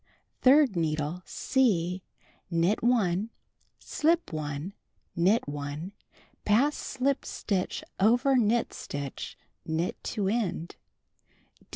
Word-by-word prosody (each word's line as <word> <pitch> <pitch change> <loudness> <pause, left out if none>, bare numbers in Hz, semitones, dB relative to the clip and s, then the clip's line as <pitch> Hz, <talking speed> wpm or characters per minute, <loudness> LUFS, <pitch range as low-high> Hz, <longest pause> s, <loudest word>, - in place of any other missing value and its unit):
3d 270 -4 +6
needle 155 +1 -1
— - - -44 0.3
(C) 185 -9 +2 0.5
Knit 175 +4 +1
1, 220 -4 +2 0.5
slip 330 - 0
1, 150 +4 -4 0.4
knit 190 +4 +3
1, 145 +4 -5 0.5
pass 255 +8 +3
slipped 270 +1 -1
stitch 190 -4 -2 0.2
over 245 +7 +4
knit 235 -1 +2
stitch, 140 -1 -6 0.3
knit 160 +2 -2
to 205 -4 -2
end. 195 -6 -1
195 Hz, 95 wpm, -28 LUFS, 165-240 Hz, 0.5 s, 3d